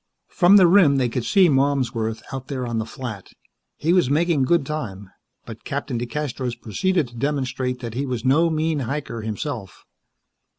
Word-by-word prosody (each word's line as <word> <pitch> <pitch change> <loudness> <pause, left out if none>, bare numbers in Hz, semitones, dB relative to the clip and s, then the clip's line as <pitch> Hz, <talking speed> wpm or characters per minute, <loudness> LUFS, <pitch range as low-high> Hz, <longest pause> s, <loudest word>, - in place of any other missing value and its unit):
From 185 +2 +6
the 190 - +7
rim 170 -5 +5
they 130 -3 +1
could 115 0 -3
see 195 -3 +5
Malmsworth 130 -6 0
out 130 -1 -6
there 130 -3 -3
on 115 -1 -2
the 110 - -4
flat. 110 -5 -8 0.4
He 165 +3 +1
was 180 -8 +3
making 155 -1 +2
good 165 0 +2
time, 105 -11 -5 0.3
but - - -10
Captain 120 - -3
DeCastros 125 -2 -4
proceeded 165 - 0
to 120 - -16
demonstrate 130 -1 -2
that 115 -3 -5
he 135 +4 -2
was 125 -2 -4
no 155 +6 +4
mean 160 -1 0
hiker, 130 -2 -4
himself. 110 - -6
135 Hz, 170 wpm, -22 LUFS, 120-155 Hz, 0.4 s, the